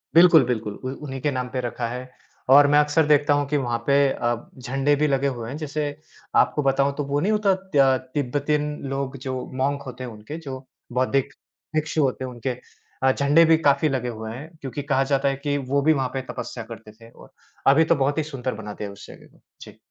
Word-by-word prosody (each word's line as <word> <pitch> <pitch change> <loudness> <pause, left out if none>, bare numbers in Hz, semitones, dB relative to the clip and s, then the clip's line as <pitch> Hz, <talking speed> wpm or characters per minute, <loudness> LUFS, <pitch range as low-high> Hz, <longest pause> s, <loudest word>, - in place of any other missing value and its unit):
बिल्कुल, 170 -3 +8
बिल्कुल, 110 -4 -2
उ 130 - -2
उन्हीं 135 -2 -5
के 145 - +1
नाम 125 -2 -2
पे 130 - -3
रखा 120 0 -3
है 125 +2 -6 0.4
और 145 +1 +8
मैं 145 +1 +5
अक्सर 150 +2 +3
देखता 145 -1 +4
हूँ 145 0 +1
कि 145 +1 0
वहाँ 120 -1 0
पे 140 - +4 0.2
अ, 120 -1 0 0.2
झंडे 135 +3 +1
भी 150 - +4
लगे 140 -1 +1
हुए 115 -1 -6
हैं। 140 - -5
जैसे 155 0 -3 0.5
आपको 150 - +3
बताऊँ 140 +1 +2
तो 145 - -1
वो 145 - +2
नहीं 190 +8 +1
होता 210 -2 +3 0.2
तय 135 -2 +5 0.2
तिब्बतन 145 +2 0 0.3
लोग 135 0 -3
जो 130 - -2 0.3
मोंक 140 +1 0
होते 130 0 -7
हैं 125 - -6
उनके 110 +8 -8
जो 130 0 -6 0.3
बौद्धिक 130 +1 +1 0.4
भिक्षु 155 0 0
होते 130 -1 -1
हैं 130 - -6
उनके 120 +2 -4 0.5
अ, 130 - +5
झंडे 145 +5 +4
भी - - +6
काफ़ी 140 +2 +3
लगे 130 -3 -2
हुए 110 0 -5
हैं, 135 +7 -8
क्योंकि 135 +1 -5
कहा 135 0 +4
जाता 135 +1 +2
है 135 - -1
कि 145 -1 0
वो 140 0 +3
भी 155 +3 +4
वहाँ 135 -3 -1
पे 135 - -2
तपस्या 115 - -6
करते 110 -1 -10
थे। 115 +1 -17
और - - -17 0.4
अभी 140 +4 +6
तो - - +3
बहुत 145 +3 0
ही 155 - +1
सुंदर 135 -4 -4
बना 105 -1 -7
दिया 105 - -6
है - - -9
उस 100 - -13
जगह - - -13
को। - - -26 0.2
जी। - - -12
135 Hz, 230 wpm, -23 LUFS, 125-145 Hz, 0.5 s, बिल्कुल